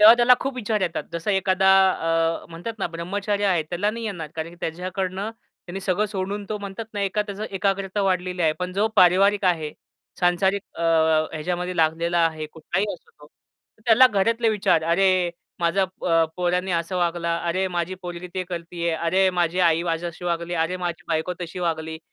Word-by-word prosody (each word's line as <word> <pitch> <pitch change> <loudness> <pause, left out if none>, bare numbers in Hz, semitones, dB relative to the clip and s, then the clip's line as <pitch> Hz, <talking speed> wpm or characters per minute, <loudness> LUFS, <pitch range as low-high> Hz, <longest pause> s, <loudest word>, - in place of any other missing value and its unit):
तेव्हा 220 +2 +10
त्याला 240 +1 +6
खूप 270 0 -2
विचार 220 -3 -1
येतात. 175 -3 -1
जसा 170 +4 -2
एखादा 190 -1 +2 0.2
अ, 165 -1 0
म्हणतात 210 +7 -7
ना - - 0
ब्रह्मचार्य 200 +5 -2
आहे, 175 -4 +2
त्याला 175 +6 -1
नाही 230 +1 -6
येणार. 175 -8 -4
कारण 160 0 -4
की 175 - -15
त्याच्याकडनं 185 +4 -3
त्यांनी 195 -5 -11
सगळं 195 +2 0
सोडून 200 +1 -4
तो 215 - -3
म्हणतात 200 +2 -6
ना, 205 - -2
एका 200 +2 0
त्याच 205 -1 -8
एकाग्रता 195 0 -1
वाढलेली 180 -2 0
आहे. 155 - +3
पण 180 0 -3
जो 200 +3 +2
पारिवारिक 195 +3 +5
आहे 160 -4 +1 0.5
सांसारिक 190 +3 +2
अ, 170 - -5 0.5
ह्याच्यामध्ये 180 +3 -3
लागलेला 165 +2 +1
आहे 155 -1 -4
कुठलाही 165 +6 -2
असो - - -19
तो. 150 0 -18 0.6
त्याला 240 +3 +8
घरातले 230 +1 +1
विचार 205 -6 +2
अरे! 180 +1 +3 0.3
माझ्या 170 +3 +2
अ, 170 -3 +1
पोरांनी 180 +1 0
असं 170 +2 -1
वागलं. 170 -1 0
अरे 175 +3 -1
माझी 175 0 -2
पोरगी 175 0 -6
ते 185 - -1
करतीये. 170 -1 -3
अरे 185 +4 +2
माझी 175 -1 0
आई 165 -2 +3
माझ्याशी 170 +1 -3
वागली. 170 0 -2
अरे 165 +2 0
माझी 175 -1 -4
बायको 160 +2 0
तशी 175 +1 -6
वागली 160 -2 -2
180 Hz, 175 wpm, -24 LUFS, 170-195 Hz, 0.6 s, तेव्हा